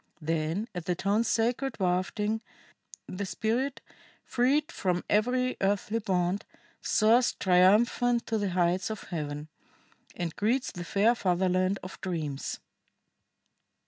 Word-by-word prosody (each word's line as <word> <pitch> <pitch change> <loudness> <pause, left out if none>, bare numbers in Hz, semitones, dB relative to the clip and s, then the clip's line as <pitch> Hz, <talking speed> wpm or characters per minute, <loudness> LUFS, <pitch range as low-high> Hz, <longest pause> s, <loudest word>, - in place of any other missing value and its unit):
Then, 165 +6 -1
at 175 -3 -5
the 180 - 0
tones' 205 +5 +1
sacred 240 +3 0
wafting, 200 +4 0 0.7
the 185 +2 -4
spirit, 235 +7 -1 0.4
freed 285 +6 +1
from 180 - -1
every 250 +4 +1
earthly 205 +3 0
bond, 185 -2 0 0.4
soars 230 +3 +3
triumphant 215 +6 +3
to 225 -1 -1
the 200 -1 0
heights 180 +2 +1
of 215 -2 -5
Heaven, 150 -3 -5 0.7
and 170 -2 -4
greets 240 +5 0
the 175 - -6
fair 205 +6 +3
fatherland 185 -2 +1
of 185 - -9
dreams." 155 -7 -3
200 Hz, 115 wpm, -29 LUFS, 180-230 Hz, 0.7 s, soars